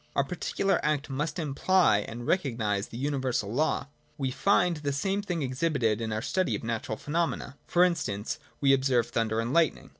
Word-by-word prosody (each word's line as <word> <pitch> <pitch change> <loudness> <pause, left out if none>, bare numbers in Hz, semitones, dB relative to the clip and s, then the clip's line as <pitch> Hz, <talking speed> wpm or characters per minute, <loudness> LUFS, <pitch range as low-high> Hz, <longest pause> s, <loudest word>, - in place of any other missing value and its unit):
Our 140 - +3
particular 180 +5 0
act 150 -2 -1
must 150 +5 -2
imply 160 - +3
and 115 +3 -6
recognise 115 - 0
the 115 - -9
universal 130 -6 -1
law. 155 +5 +1 0.2
— - - -38
We 135 -2 -1
find 175 +2 +2
the 145 -1 -2
same 195 +8 0
thing 175 -6 -2
exhibited 130 -5 0
in 110 -1 -2
our 110 +1 -2
study 185 -1 0
of - - -6
natural 115 -1 -3
phenomena. 160 -3 -2
For 175 - +4
instance, 110 - -1 0.2
we 135 -1 +5
observe 130 -3 +2
thunder 110 -1 0
and 115 +3 -1
lightning. 165 -3 +2
140 Hz, 180 wpm, -28 LUFS, 115-165 Hz, 0.2 s, we